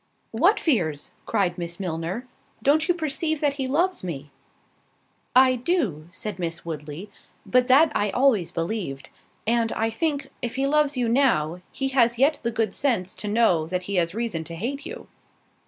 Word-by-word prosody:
"What - - +3
fears?" 170 - 0 0.2
cried 180 -2 0
Miss 170 +1 -5
Milner: 180 +6 -3 0.4
"don't 305 +5 +3
you 355 - +3
perceive 315 -1 -1
that 290 -2 +1
he 260 - -1
loves 345 - +1
me?" 145 -5 -6 1.0
"I 255 0 +7
do," 240 - -1
said 200 +2 -6
Miss 170 -1 -4
Woodley, 155 +4 -6 0.3
"but 250 0 +3
that 290 +4 +6
I 205 - +1
always 230 -6 +3
believed; 165 -7 -4 0.3
and, 230 0 +2
I 225 0 0
think, 285 +1 -2
if 240 -2 -3
he 270 +1 +1
loves 295 -1 +2
you 245 -2 +1
now, 205 - +2
he 270 0 -2
has 240 -3 +3
yet 285 +4 +3
the 235 - -1
good 225 -3 -1
sense 210 -10 0
to 210 - -5
know 205 -7 +3
that 180 +1 -2
he 200 +1 -2
has 170 +1 +1
reason 225 -8 -2
to 170 - -6
hate 265 - -4
you." 475 - -8
225 Hz, 170 wpm, -25 LUFS, 175-275 Hz, 1.0 s, I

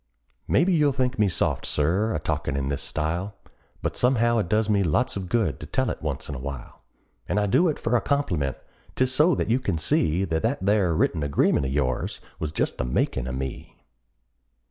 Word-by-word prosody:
Maybe 180 +5 +3
you'll 150 -4 +3
think 130 -2 -1
me 105 - +4
soft, 90 - 0
Sir, 95 +8 +1
a - - 0
talkin' 70 -2 -2
in 70 0 -2
this 70 -1 -2
style, 85 +6 -3 0.5
But - - -1
somehow 120 -2 +3
it 85 - -2
does 110 +1 +2
me 105 -2 +2
lots 100 +8 +1
of 95 -3 -5
good 110 -9 0
to - - -8
tell - - 0
it - - -7
once - - -4
in 75 - -5
a 70 - -5
while; 65 -2 -7 0.5
And 105 - +1
I 105 - +1
do 165 - +3
it 150 - -2
for 115 - 0
a 120 - +3
compliment 90 - -1 0.4
'tis 130 0 +2
so 155 +4 +4
that - - -1
you 125 - +3
can 100 -10 -1
see 80 +3 +1
That 80 -3 -1
that 115 -3 -1
there 100 -5 +3
written 80 0 +1
agreement 70 -1 +2
of - - -3
yours 65 -3 -1 0.2
was 75 - -2
just - - -1
the - - +1
makin' 60 0 -1
of 65 - -3
me. 65 0 -6
95 Hz, 210 wpm, -25 LUFS, 75-120 Hz, 0.5 s, me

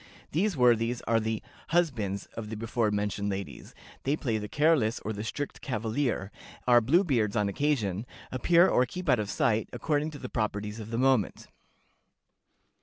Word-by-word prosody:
These 185 +2 +1
worthies 120 -1 +3
are 115 -1 +2
the 110 0 -2 0.2
'husbands' 120 - 0
of 110 -2 -6
the 110 - -5
before 115 0 0
mentioned 105 0 -1
ladies. 95 -1 -6 0.3
They 140 +2 +1
play 115 -8 -1
the 105 - -5
careless 145 -5 +2
or 110 - -3
the 105 0 -5
strict 145 +6 -4
cavalier; 115 -3 -1 0.3
are 120 -1 +6
Blue 160 - +4
beards 115 - +1
on 105 -2 +2
occasion; 110 -3 0 0.2
appear 170 +8 +4
or 125 - +3
keep 180 +5 -7
out 125 -5 +4
of 105 -1 -2
sight, 115 -7 +1
according 150 0 -1
to 150 - -9
the - - -6
proprieties 105 -1 -2
of 110 0 -7
the 115 - -2
moment." 130 -5 +1
115 Hz, 170 wpm, -29 LUFS, 105-145 Hz, 0.3 s, are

